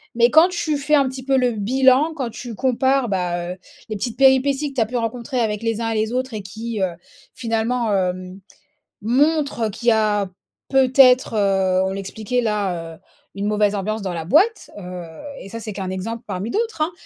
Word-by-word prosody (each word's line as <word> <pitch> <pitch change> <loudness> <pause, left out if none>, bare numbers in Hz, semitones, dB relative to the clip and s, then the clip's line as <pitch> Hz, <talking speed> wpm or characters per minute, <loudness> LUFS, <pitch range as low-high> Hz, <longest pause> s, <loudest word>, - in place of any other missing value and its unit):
mais 235 0 +5
quand 325 +4 +6
tu 315 -4 -1
fais 295 +2 +2
un 280 -2 +3
petit 260 0 -6
peu 270 0 +2
le 250 -1 +2
bilan, 260 +7 +3
quand 265 -6 -3
tu 235 0 -8
compares, 260 +1 +1
bah, 175 -3 -2
heu, - - -14 0.3
les 215 - -4
petites 225 +3 -4
péripéties 270 +2 +3
que - - -21
tu 250 - +1
as 225 - +3
pu 245 +2 -3
rencontrer 235 +3 -3
avec 215 -2 -1
les 225 -1 -1
uns 225 -1 -1
et - - -2
les 220 +1 0
autres 255 0 -2
et 215 - -4
qui, 220 +2 -5
heu, 185 -2 +1 0.4
finalement 230 -1 -1
hem, 185 0 -2 0.6
montrent, 275 0 +1
qu'il 235 +4 -7
y - - +6
a 210 -3 +1 0.4
peut-être, 260 -2 +4
heu, 195 -2 +2
on 190 - -2
l'expliquait 215 +5 -3
là, 190 -7 -2
heu, - - -19 0.4
une 200 - -3
mauvaise 210 -1 +2
ambiance 215 +2 -2
dans 190 -2 -3
la 165 -2 -4
boîte, 380 - +2
heu, 180 -2 -7 0.3
et - - -10
ça 230 - -6
c'est 215 - -5
qu'un 190 -1 -4
exemple 225 +5 -5
parmi 190 +5 -4
d'autres, 445 -6 -2
hein, 310 +3 +1
230 Hz, 205 wpm, -21 LUFS, 200-260 Hz, 0.6 s, quand